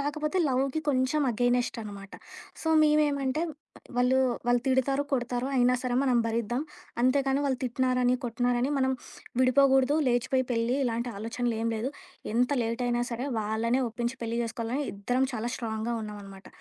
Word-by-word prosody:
కాకపోతే 300 +4 -1
లవ్‌కి 270 +3 0
కొంచెం 260 +2 +2
అగైనెస్ట్ 245 +1 +1
అనమాట. 200 -2 -9 0.5
సో, 320 - -2
మేమేమంటే 295 -2 +2 0.6
వాళ్ళు 250 +1 +3 0.3
వాళ్ళు 245 0 +3
తిడతారు, 265 +1 +2
కొడతారు 245 0 -1
అయినా 250 0 +4
సరే 250 -1 -1
మనం 255 -3 +2
భరిద్దాం 235 +3 -1 0.4
అంతే 255 +3 +4
కానీ 270 +1 +2
వాళ్ళు 265 -3 0
తిట్టినారని, 250 0 +1
కొట్టినారని 245 +2 0
మనం 265 0 +2 0.5
విడిపోకూడదు 265 +1 +4
లేచిపోయి 250 +2 +1
పెళ్లి 235 +1 +1
ఇలాంటి 235 0 -1
ఆలోచనలు 230 +3 -2
ఏం 230 - 0
లేదు 230 +5 -2 0.4
ఎంత 245 +3 +2
లేట్ 230 +2 -2
అయినా 240 0 +1
సరే 240 +3 -3
వాళ్ళని 220 +4 0
ఒప్పించి 235 +3 -3
పెళ్లి 230 0 -2
చేసుకోవాలని 230 +4 -3
ఇద్దరం 245 +7 0
చాలా 235 +1 -2
స్ట్రాంగ్‌గా 225 0 -3
ఉన్నామనమాట. 200 -2 -9
245 Hz, 145 wpm, -28 LUFS, 230-265 Hz, 0.6 s, అయినా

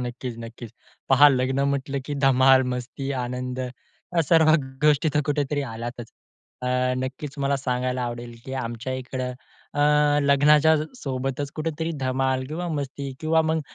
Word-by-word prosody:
नक्कीच, 125 0 -5
नक्कीच. 115 0 -9 0.4
पहा 140 +2 +8
लग्न 130 0 +1
म्हटलं, 140 0 -2
की 145 - -3
धमाल, 130 0 +6
मस्ती, 130 +2 -5
आनंद 125 +1 -4
या 130 +7 -5
सर्व 160 -2 +5
ग 150 -4 +1 0.2
गोष्टी 150 +1 +4
तिथे 150 0 +1
कुठेतरी 145 0 0
आल्यातच. 120 +1 -6 0.5
अ, - - -2 0.4
नक्कीच 135 +2 -5
मला 140 0 +2
सांगायला 125 -1 -1
आवडेल, 120 0 -5
की 130 - -7
आमच्या 120 +2 -4
इकडे 130 0 -4 0.5
अ, 145 - 0 0.4
लग्नाच्या 150 +3 +5 0.2
सोबतच 135 +1 -3
कुठेतरी 160 +1 -2
धमाल 130 0 0
किंवा 170 +4 -4
मस्ती 140 0 -5
किंवा 160 0 +3
मग 160 0 +1
135 Hz, 145 wpm, -24 LUFS, 125-145 Hz, 0.5 s, पहा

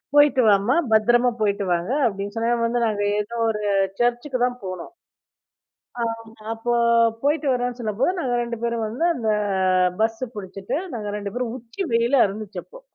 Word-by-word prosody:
"போயிட்டு 290 -3 +6
வாம்மா, 205 +5 +3 0.2
பத்திரமா 240 +3 +4
போயிட்டு 200 -1 +1
வாங்க" 175 +5 -2 0.2
அப்படின்னு 200 0 -5
சொன்னாங்க. 230 +1 +1
வந்து 240 +1 0
நாங்க 205 -1 -1 0.2
ஏதோ 230 +3 -4
ஒரு 210 -1 -2 0.4
சர்ச்சுக்குதான் 245 +1 0
போனோம். 185 - -6 1.1
ஆமா. 230 -1 0 0.4
அப்ப 240 +2 -1 0.5
போயிட்டு 295 +2 +1
வரோம்னு 245 0 -2
சொல்லும்போது, 230 - 0
நாங்க 250 -6 -1
2 235 -1 -4
பேரும் 235 -2 -1
வந்து 245 +10 -2
அந்த 225 -6 -1 0.7
பஸ் 225 +2 0
புடிச்சுட்டு 195 +3 -5 0.2
நாங்க 210 -2 -4
ரெண்டு 200 -1 -5
பேரும் 245 -1 -2
உச்சி 240 - -6
வெயிலா 235 +3 +3
இருந்துச்சு 205 +1 -6
அப்போ. - - -14
235 Hz, 150 wpm, -23 LUFS, 210-245 Hz, 1.1 s, போயிட்டு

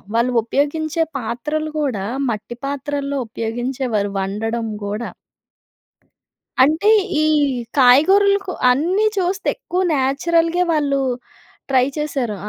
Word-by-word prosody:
వాళ్ళు 240 +2 +2
ఉపయోగించే 300 +6 0 0.2
పాత్రలు 300 +7 -3
కూడా 230 -10 -2 0.2
మట్టి 220 +1 -5
పాత్రల్లో 280 0 -3
ఉపయోగించేవారు 230 -2 -2
వండడం 225 +4 -2 0.2
గూడా. 210 +3 -4 1.5
అంటే 315 +9 +3 0.3
ఈ - - +3 0.5
కాయగూరలకు 385 +10 +5 0.2
అన్నీ 350 +11 +2
చూస్తే 375 +1 -1
ఎక్కువ 370 -7 -2
నేచురల్‌గే 330 +6 +1
వాళ్ళు 285 -3 +1 0.7
ట్రై 260 -2 +4
చేశారు. 275 -7 -2
275 Hz, 90 wpm, -19 LUFS, 235-315 Hz, 1.5 s, కాయగూరలకు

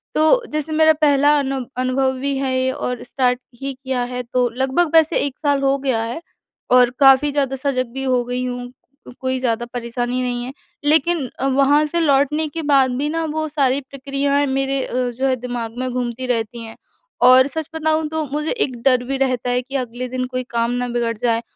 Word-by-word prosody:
तो 315 +11 +4
जैसे 305 +1 -3
मेरा 315 0 +5
पहला 290 -1 +3
अनु 270 -1 -2
अनुभव 260 +1 +1
भी 280 +1 -1
है 270 -1 -1
ये 260 0 +1
और 250 -1 -4
स्टार्ट 250 -1 0 0.2
ही 275 0 -3
किया 260 -1 -3
है 250 0 -3
तो 245 +1 0
लगभग 270 +7 0
वैसे 320 0 +5
1 280 -1 -6
साल 285 -2 +1
हो 275 0 +2
गया 260 -4 0
है। 240 +8 -5 0.5
और 250 -1 +6
काफ़ी 270 +1 +6
ज़्यादा 275 -2 0
सजग 260 -2 -1
भी 270 0 -4
हो 255 -2 +1
गई 250 +1 -3
हूँ, 245 0 -5 0.5
कोई 260 0 -1
ज़्यादा 240 -1 -1
परेशानी 245 +1 -2
नहीं 245 -1 -2
है। 260 - -7 0.3
लेकिन 315 -1 +3
अ, 270 - 0
वहाँ 280 +3 +3
से 340 +3 -1
लौटने 295 +1 +2
के 325 +2 -5
बाद 265 -2 +4
भी 290 +3 -1
ना 330 +1 -1
वो 315 0 -1
सारी 280 -2 +1
प्रक्रियाएँ 280 +1 -1
मेरे 270 0 0
अ, - - -9
जो 250 +1 -1
है 260 - +2
दिमाग 245 -2 -5
में 255 0 -2
घूमती 245 0 -3
रहती 230 -1 -2
हैं 225 - -10 0.5
और 260 +1 +7
सच 315 +2 -5
बताऊँ 315 0 0
तो 315 0 -2
मुझे 300 +1 -1
एक 260 - -2
डर 255 -2 +3
भी 270 +2 -3
रहता 255 -2 0
है 245 0 +1
कि 270 +2 -9
अगले 250 -1 -3
दिन 255 0 -3
कोई 255 0 -4
काम 235 0 0
ना 245 0 -1
बिगड़ 235 -1 -1
जाए। 230 0 0
265 Hz, 205 wpm, -20 LUFS, 250-285 Hz, 0.5 s, और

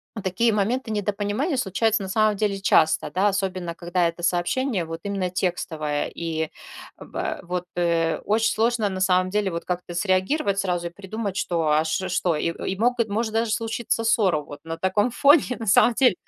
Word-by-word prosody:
в 215 - -5
такие 195 +5 +1
моменты 225 +4 0
недопонимания 210 - -1
случаются, 220 0 +1
на 190 - -6
самом 215 +1 +2
деле, 200 -1 -1
часто, 160 -4 +3
да, 195 +3 +2
особенно, 185 -3 -2
когда 175 0 0
это 170 +1 -10
сообщение 185 +5 0
вот 165 0 -6
именно 195 -3 -2
текстовое. 160 -5 -2
И, 160 -2 -2 0.5
бэ - - -5
вот, 180 0 -3
э, 165 -2 +1
очень 220 +2 +2
сложно, 225 -1 +1
на 185 -1 -4
самом 185 0 +3
деле, 205 0 0
вот 170 - -4
как-то 180 -1 -4
среагировать 195 - +1
сразу 175 -3 -1
и - - -5
придумать, 200 +2 -5
что, 170 -2 -1
а, 150 +1 +3
ш 180 +4 -2
что? 175 -2 +1
И - - -1 0.2
и 190 - -4
могут 235 -2 +1
может 220 +1 -1
даже 225 0 0
случиться 230 0 -1
ссора 200 -8 +3
вот 145 0 -11
на 165 - -4
таком 205 +6 +1
фоне, 280 0 +4
на 225 - -5
самом 235 +4 +5
деле. 250 -2 +4
195 Hz, 185 wpm, -24 LUFS, 175-220 Hz, 0.5 s, самом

